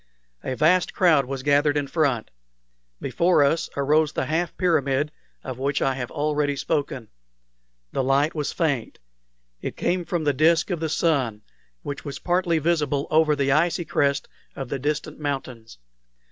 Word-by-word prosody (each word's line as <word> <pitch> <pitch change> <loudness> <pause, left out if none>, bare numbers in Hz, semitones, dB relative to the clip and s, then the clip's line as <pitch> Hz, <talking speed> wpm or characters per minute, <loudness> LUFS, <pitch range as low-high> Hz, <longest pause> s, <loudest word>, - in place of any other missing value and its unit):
A 130 - -3
vast 170 +6 +3
crowd 160 -7 +4
was 135 0 -5
gathered 145 +1 +3
in 145 - 0
front. 140 -6 0 0.7
Before 155 +4 +2
us 155 +4 +1
arose 150 +2 +2
the - - -1
half 160 +4 -1
pyramid 150 -5 +1 0.3
of 130 -1 -6
which 140 +2 0
I 135 - +1
have 125 -2 -5
already 150 -1 0
spoken. 135 -4 -2 0.8
The - - -1
light 140 +4 +2
was 150 -2 -2
faint. 145 -9 -1 0.6
It - - -5
came 180 0 0
from 170 -2 -2
the 145 -1 +2
disk 160 +6 +3
of 175 - -1
the 160 -1 -2
sun, 130 -10 0 0.4
which 140 - -5
was 140 -2 -6
partly 175 -1 +1
visible 150 -3 0
over 155 -1 +4
the 140 -1 +1
icy 170 +4 +2
crest 140 -3 0 0.3
of 135 -2 -6
the 140 - -3
distant 150 +3 -3
mountains. 130 - -5
145 Hz, 160 wpm, -24 LUFS, 135-160 Hz, 0.8 s, crowd